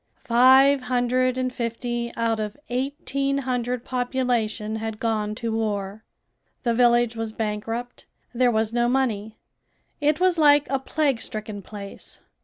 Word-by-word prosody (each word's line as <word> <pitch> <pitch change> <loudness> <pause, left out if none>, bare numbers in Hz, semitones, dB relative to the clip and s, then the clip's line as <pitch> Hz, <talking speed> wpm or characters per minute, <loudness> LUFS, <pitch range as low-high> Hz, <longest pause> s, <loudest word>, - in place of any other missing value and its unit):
Five 265 +3 +6
hundred 255 0 +1
and 255 -1 -1
fifty 235 0 -3
out 230 -1 0
of 210 +2 -4
eighteen 275 +2 -1
hundred 250 -2 -2
population 245 -4 -1
had 220 -1 -5
gone 215 -2 -1
to 230 0 -3
war." 210 -1 -3 0.6
The 235 -2 +1
village 240 -1 +3
was 225 -1 -4
bankrupt. 225 +3 -4 0.3
There 250 +1 +3
was 220 -1 0
no 240 0 +2
money. 220 -5 -1 0.6
It 295 +1 +2
was 365 -2 +2
like 290 -1 +6
a 270 - +1
plague 275 -3 0
stricken 215 -1 -5
place. 200 0 -9
240 Hz, 135 wpm, -24 LUFS, 220-255 Hz, 0.6 s, Five